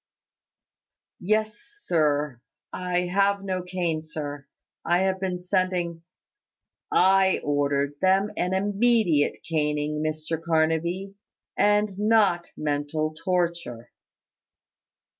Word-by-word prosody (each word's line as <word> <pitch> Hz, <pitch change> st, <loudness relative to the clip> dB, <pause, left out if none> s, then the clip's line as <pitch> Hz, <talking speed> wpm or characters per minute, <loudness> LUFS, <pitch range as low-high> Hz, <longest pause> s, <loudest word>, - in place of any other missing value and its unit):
"Yes, 215 Hz, +3 st, 0 dB
sir. 150 Hz, -, -1 dB, 0.3 s
I 180 Hz, -1 st, -1 dB
have 195 Hz, +2 st, +1 dB
no 185 Hz, -2 st, -2 dB
cane, 175 Hz, -3 st, -2 dB
sir. 145 Hz, -2 st, -7 dB, 0.4 s
I 175 Hz, +2 st, +2 dB
have 190 Hz, 0 st, 0 dB
been 180 Hz, -2 st, -3 dB
sending 180 Hz, -2 st, -1 dB, 0.5 s
" -, -, -64 dB, 0.2 s
"I 190 Hz, 0 st, +4 dB
ordered 145 Hz, -1 st, 0 dB
them 190 Hz, +2 st, +3 dB
an 180 Hz, +1 st, -1 dB
immediate 205 Hz, -5 st, +2 dB
caning, 150 Hz, -1 st, -1 dB
Mr 155 Hz, +1 st, -3 dB
Carnaby, 170 Hz, +4 st, 0 dB, 0.4 s
and 205 Hz, -1 st, +2 dB
not 210 Hz, -5 st, +3 dB
mental 150 Hz, +1 st, -2 dB
torture. 170 Hz, -, -2 dB
175 Hz, 95 wpm, -25 LUFS, 155-190 Hz, 0.5 s, I